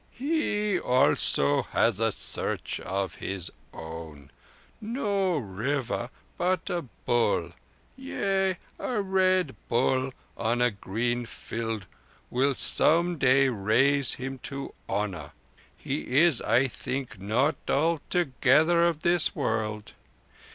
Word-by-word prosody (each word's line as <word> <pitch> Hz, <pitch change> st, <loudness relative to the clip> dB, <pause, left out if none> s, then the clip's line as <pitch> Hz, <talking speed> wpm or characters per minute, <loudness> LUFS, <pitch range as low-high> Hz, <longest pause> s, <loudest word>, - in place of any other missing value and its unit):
"He 215 Hz, -, 0 dB
also 125 Hz, -, +3 dB
has 115 Hz, -3 st, +1 dB
a 115 Hz, 0 st, +2 dB
Search -, -, -2 dB
of 95 Hz, 0 st, -3 dB
his 95 Hz, -3 st, -4 dB, 0.2 s
own. 80 Hz, -3 st, -9 dB, 0.5 s
No 200 Hz, -, 0 dB
river, 120 Hz, +3 st, -2 dB, 0.3 s
but 180 Hz, -1 st, 0 dB
a 175 Hz, -1 st, -1 dB
Bull. 115 Hz, -, 0 dB, 0.4 s
Yea, 195 Hz, -8 st, -1 dB, 0.2 s
a 245 Hz, -4 st, -1 dB
Red 185 Hz, -, +2 dB
Bull 130 Hz, +2 st, +1 dB, 0.2 s
on 115 Hz, +1 st, 0 dB
a 125 Hz, 0 st, +3 dB
green 115 Hz, +4 st, -2 dB
field 115 Hz, -3 st, -5 dB, 0.5 s
will 135 Hz, +2 st, +2 dB
some 170 Hz, +6 st, +2 dB
day 135 Hz, +1 st, +4 dB
raise 125 Hz, +6 st, +2 dB
him 135 Hz, +1 st, -6 dB
to 140 Hz, +1 st, -6 dB, 0.2 s
honour. 95 Hz, -7 st, -3 dB, 0.4 s
He 135 Hz, -, -3 dB
is, 170 Hz, -6 st, +4 dB
I 120 Hz, +4 st, +3 dB
think, 125 Hz, -3 st, -5 dB
not 125 Hz, +10 st, +1 dB
altogether 160 Hz, 0 st, +2 dB
of 170 Hz, -3 st, +1 dB
this 175 Hz, -1 st, +3 dB
world. 110 Hz, -5 st, -2 dB
130 Hz, 110 wpm, -27 LUFS, 110-170 Hz, 0.5 s, day